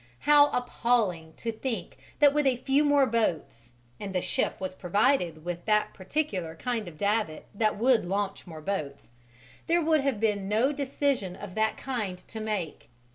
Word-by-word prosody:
How 290 0 +6
appalling 225 -10 0
to 230 - -3
think 225 +1 -4 0.2
that 290 -1 +6
with 295 -1 +2
a 260 - +3
few 270 +4 +2
more 290 -2 +4
boats 165 - -1 0.3
and 195 -2 -6
the - - +3
ship - - -1
was 185 -1 -4
provided 180 - +1
with 175 0 -4
that 210 -1 +2
particular 185 - -3
kind 230 +2 -3
of 160 -3 -10
davit 205 -5 -1
that 215 0 +1
would 240 +1 +3
launch 195 +2 -3
more 160 -2 -9
boats 155 -9 -4 0.6
there 335 -1 +2
would 315 -2 +3
have 270 -6 0
been 205 -3 0
no 225 +7 +3
decision 275 -8 -1
of 200 -1 -9
that 220 +1 0
kind 220 -9 -3
to 200 +4 -9
make! 210 - -4
215 Hz, 170 wpm, -28 LUFS, 180-265 Hz, 0.6 s, How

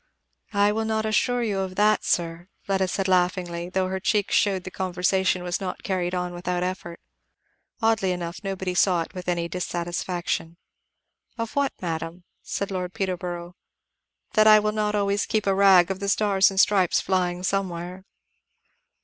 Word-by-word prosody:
"I 205 +1 +4
will 220 +1 -1
not 220 0 -1
assure 240 +3 +1
you 205 -4 -1
of 190 -1 -3
that, 210 +1 +3
sir," 170 0 -1 0.2
Fleda 190 -1 0
said 195 +1 -2
laughingly, 180 -1 0
though 185 0 0
her 190 0 -3
cheeks 205 +1 0
showed 195 -3 +2
the 185 - -7
conversation 185 0 0
was 175 +2 -2
not 185 -2 -5
carried 185 -2 -1
on 180 0 -2
without 180 0 -2
effort. 180 -2 -5 0.8
Oddly 220 -4 +2
enough 175 +1 -5
nobody 190 -2 -3
saw 180 -2 +3
it - - -14
with 180 -1 -8
any 170 -1 0
dissatisfaction. 175 -1 -3 0.8
"Of 230 -1 -4
what, 280 -1 +1
madam?" 165 +1 -4 0.2
said 200 0 -4
Lord 180 0 -4
Peterborough. 180 -3 -4 0.8
"That 215 -3 +5
I 215 0 +9
will 210 0 +1
not 210 0 -1
always 200 0 0
keep 215 -1 0
a 195 - +3
rag 190 -2 +5
of 190 - -4
the 200 0 -2
stars 195 -1 +3
and 195 -1 -2
stripes 195 -3 +4
flying 180 -1 -1
somewhere." 185 -1 -3
185 Hz, 165 wpm, -25 LUFS, 175-200 Hz, 0.8 s, I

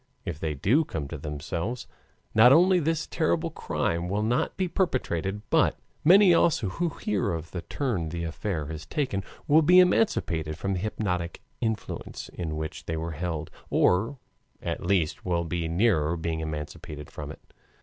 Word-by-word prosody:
If 85 -6 -4
they 80 -2 -2
do 115 - +3
come 75 - -4
to - - -5
themselves, 80 - -4 0.5
not 115 +3 +8
only 180 +5 +6
this 165 0 0
terrible 165 0 0
crime 85 - -2
will 105 +2 0
not 120 +3 0
be 185 - +1
perpetrated, 105 - -1
but - - +3 0.3
many 185 +3 +7
also 150 - +3
who 170 - -1
hear 105 - -1
of 80 0 -5
the 85 - -4
turn 105 - -2
the 85 +1 -4
affair 85 0 -3
has 80 +1 -7
taken 130 -10 -1 0.2
will 155 +2 +6
be 180 +4 +6
emancipated 90 - +3
from 100 +3 -2
the 90 - -1
hypnotic 90 -4 -2 0.2
influence 110 -2 -4
in 80 -3 -4
which 80 0 -5
they 80 - -2
were 80 +1 -3
held, 80 -1 -4 0.2
or 110 +10 +2 0.4
at - - -4
least 90 -6 +1
will 85 -2 0
be 85 0 -2
nearer 85 -3 +2
being 80 0 -2
emancipated 75 -1 -6
from - - -6
it. - - -15
90 Hz, 165 wpm, -27 LUFS, 80-130 Hz, 0.5 s, not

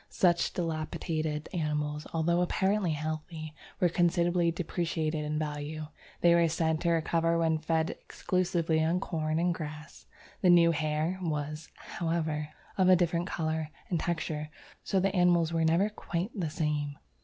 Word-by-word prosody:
Such 175 -2 +2
depilated 155 -2 -2
animals, 150 -2 -2
although 170 +2 +1
apparently 190 0 +1
healthy, 155 +1 -5 0.3
were 180 - +4
considerably 175 0 +2
depreciated 165 -2 -2
in 150 0 -2
value. 150 0 -4 0.3
They 170 -1 +6
were 170 0 +5
said 160 -1 0
to 170 - +1
recover 165 0 +2
when 160 -1 +2
fed 160 +1 0
exclusively 170 -4 0
on 165 +3 +2
corn 155 -4 -2
and 175 +1 +2
grass. 155 -2 -8 0.3
The 185 - +4
new 170 -1 +7
hair 155 +3 -1
was, 150 -1 -3
however, 160 -3 -2 0.3
of 185 -1 +5
a 185 - +8
different 175 0 +1
colour 160 -3 -2 0.2
and 170 - +1
texture, 155 -3 -2 0.3
'so 195 - +1
the 195 +1 +1
animals 175 -2 +3
were 165 -1 +2
never 165 +5 +3
quite 200 -1 -4
the 180 -8 -2
same.' 150 -2 -2
165 Hz, 145 wpm, -30 LUFS, 155-175 Hz, 0.3 s, a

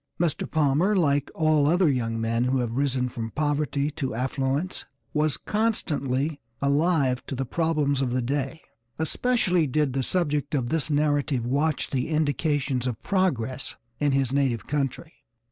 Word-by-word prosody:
Mr. 165 -3 0
Palmer, 160 +6 +2
like 145 -6 +2
all 155 -2 +3
other 175 +3 +4
young 115 -5 0
men 115 +2 0
who 130 +1 +1
have 120 -3 -1
risen 130 -2 +1
from 115 -2 -5
poverty 145 0 0
to 130 -5 -3
affluence, 135 +7 -2 0.3
was 150 -2 +1
constantly 150 - -1 0.2
alive 140 -2 +2
to 135 - -4
the 135 +1 -2
problems 150 -1 0
of 130 - 0
the 125 +1 0
day; 140 +4 -2 0.4
especially 180 0 +1
did 140 0 +1
the 135 - 0
subject 150 -1 0
of 125 -4 -1
this 160 0 0
narrative 145 -4 +1
watch 145 +4 0
the 130 +1 -1
indications 145 -4 0
of 120 -4 -3
progress 135 - 0 0.2
in 145 -1 +2
his 135 -1 +1
native 135 -5 +1
country. 150 +3 -2
145 Hz, 150 wpm, -26 LUFS, 130-155 Hz, 0.4 s, other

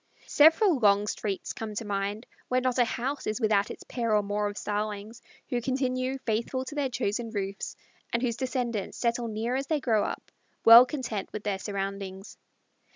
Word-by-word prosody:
Several 320 - +5
long 205 -2 +4
streets 205 -1 -3
come 215 -2 -6
to 225 - -3
mind 205 +2 -2 0.2
where 255 - +2
not 255 0 0
a 245 - +5
house 260 +5 -3
is 215 +3 -1
without 210 -3 +2
its - - -8
pair 230 -3 -1
or 210 - +3
more 205 +1 -1
of 205 - -8
Starlings, 210 +2 -4 0.3
who 245 -1 -1
continue 255 +1 -1
faithful 235 +4 -1
to 290 - -7
their 285 -2 -1
chosen 230 0 -2
roofs, 200 -2 -4 0.4
and 235 +2 0
whose 235 -2 0
descendants 245 -6 -2
settle 235 0 0
near 225 +3 -2
as 270 +1 -2
they 310 -2 +1
grow 225 -6 +2
up, - - -5 0.3
well 235 +2 +10
content 250 -9 -4
with 210 - -6
their 200 -2 -1
surroundings. 195 -1 -5
230 Hz, 180 wpm, -28 LUFS, 205-255 Hz, 0.4 s, well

